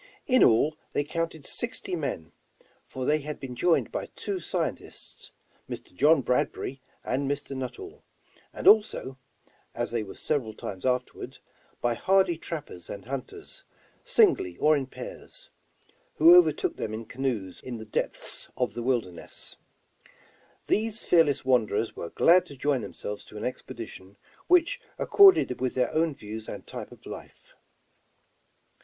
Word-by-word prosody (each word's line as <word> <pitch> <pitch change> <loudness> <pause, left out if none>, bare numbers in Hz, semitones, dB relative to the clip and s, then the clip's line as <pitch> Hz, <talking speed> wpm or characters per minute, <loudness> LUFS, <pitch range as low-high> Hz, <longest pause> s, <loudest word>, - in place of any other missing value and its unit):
In 255 -2 +5
all 145 +7 +4 0.2
they 145 - +1
counted 165 0 -4
sixty - - -4
men, 80 +1 -4 0.6
for 130 -1 -5
they 150 +3 +3
had 150 0 -6
been 130 -2 -7
joined 170 +6 +2
by - - -3
two 395 -2 -3
scientists, - - -5 0.4
Mr. 345 - -8
John 155 - +4
Bradbury 125 +1 -1 0.2
and 135 +2 -1
Mr. 140 -1 -3
Nuttall; 385 - -7 0.5
and - - -4
also, 205 -11 +4 0.3
— - - -35
as 120 0 -2
they 120 -1 0
were 100 -2 -8
several 125 -8 -2
times 95 +3 -5
afterward, 125 0 -2 0.2
— - - -35
by 120 0 +2
hardy 190 +6 +3
trappers 150 - -7
and 100 - -7
hunters, 140 - -7 0.4
singly 410 -7 +3
or 155 +1 +4
in 135 -3 -2
pairs, - - -10 0.6
who 340 +2 +8
overtook 360 -1 +4
them 110 - -3
in 115 +1 -6
canoes 115 -7 -3
or - - -12
in 125 -2 -4
the 110 - -8
depths 105 - -3
of - - 0
the 120 - -4
wilderness. 115 -9 -3 1.1
These 220 +1 0
fearless 155 -6 +3
wanderers 115 -4 +1
were 85 - -6
glad 175 - +5
to 140 - -11
join 140 -1 +1
themselves 105 -1 -6
to 105 - -11
an 105 - -4
expedition 105 -6 -7 0.3
which 360 +8 +3 0.2
accorded 380 - +6
with 130 -1 -1
their 130 - +1
own 160 -2 +1
views 110 -1 -8
and - - -7
type - - -8
of - - -15
life. - - -11
135 Hz, 150 wpm, -27 LUFS, 115-185 Hz, 1.1 s, who